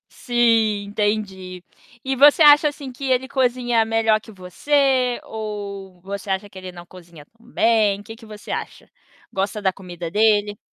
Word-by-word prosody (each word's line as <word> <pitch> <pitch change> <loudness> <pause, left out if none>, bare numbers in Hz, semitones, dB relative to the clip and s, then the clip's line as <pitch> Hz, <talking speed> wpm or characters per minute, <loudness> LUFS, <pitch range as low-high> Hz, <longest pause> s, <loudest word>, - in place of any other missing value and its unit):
Sim, 225 -4 +1
entendi. 200 -3 -3 0.4
E 265 0 -2
você 290 +4 +6
acha 295 0 +7
assim 285 -2 -8
que 255 +3 -9
ele 260 0 0
cozinha 245 -3 +1
melhor 225 -1 +1
que 220 - -15
você, 255 +7 0
ou 200 -4 -7
você 195 +2 -7
acha 190 +2 -2
que 195 - -20
ele 185 -1 -9
não 175 0 -12
cozinha 170 -4 -15
tão 230 +5 -26
bem? 215 -3 +2
Que 225 +2 -11
que 230 - -16
você 210 -1 -11
acha? - - -6 0.4
Gosta 195 +2 -2
da 190 -2 +1
comida 175 -3 -8
dele? 210 0 +2
215 Hz, 160 wpm, -21 LUFS, 195-240 Hz, 0.4 s, acha